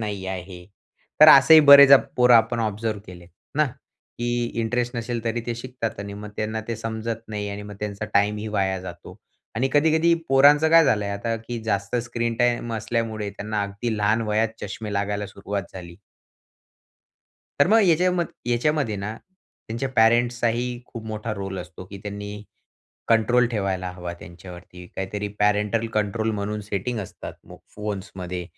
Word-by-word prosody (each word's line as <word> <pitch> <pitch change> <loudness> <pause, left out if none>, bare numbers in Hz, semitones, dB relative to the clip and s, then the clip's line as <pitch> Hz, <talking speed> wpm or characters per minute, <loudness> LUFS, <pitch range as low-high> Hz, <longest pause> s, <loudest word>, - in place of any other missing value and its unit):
नाही 100 -3 -4
आहे. 90 -1 -7 0.6
तर 155 - +10
असेही 155 +3 +9
बरेचं 140 -1 +9 0.2
पोरं 125 -1 +6
आपण 115 +1 +3
ऑब्झर्व्ह 110 0 -2
केलेत 90 -1 -12 0.3
ना, 150 - +4
की 120 -1 -5 0.2
इंटरेस्ट 120 +2 -2
नसेल 115 0 -3
तरी 115 +1 -1
ते 120 - -2
शिकतात 120 -3 -5
आणि 100 0 -7
मग 105 +1 -8
त्यांना 110 +1 -2
ते 115 - -2
समजत 115 0 -4
नाही 105 -1 -4
आणि 100 +1 -6
मग 105 0 -9
त्यांचा 105 0 -4
टाईमही 105 +1 +1
वाया 95 -2 -1
जातो 85 -2 -10 0.4
आणि 130 +4 0
कधी-कधी 160 +3 +3 0.2
पोरांचं 145 +3 +5
काय 165 -1 +7
झाल 105 -6 +2
आहे 100 - -3
आता 115 +3 -2
की 120 - -3
जास्त 100 +1 -1
स्क्रीन 120 -1 -3
टाईम 120 -1 +1
असल्यामुळे 110 -2 -3
त्यांना 105 0 -3
अगदी 100 +3 -3
लहान 105 +2 +1
वयात 110 +1 +1
चष्मे 105 +1 -6
लागायला 100 +1 -2
सुरुवात 100 0 -5
झाली. 85 -2 -10 1.6
तर - - +6
मग 225 +1 +5
याच्याम 180 +1 +2 0.3
याच्यामध्ये 120 -1 0
ना, 100 +2 -4 0.6
त्यांच्या 120 +4 -3
पॅरेंट्सचाही 120 +1 +2
खूप 115 -1 -9
मोठा 110 +1 -4
रोल 95 -1 -5
असतो, 90 +1 -9
की 100 +1 -11
त्यांनी 105 0 -7 0.7
कंट्रोल 120 +2 +3
ठेवायला 95 -4 -2
हवा 90 -1 -7
त्यांच्यावरती, 90 +1 -12
काहीतरी 100 +2 -4
पॅरेंटल 105 +2 +1
कंट्रोल 110 +1 0
म्हणून 105 0 -3
सेटिंग 115 +4 -3
असतात, 95 - -8
मग - - -13 0.2
फोन्समध्ये 95 -4 -5
110 Hz, 155 wpm, -23 LUFS, 100-120 Hz, 1.6 s, तर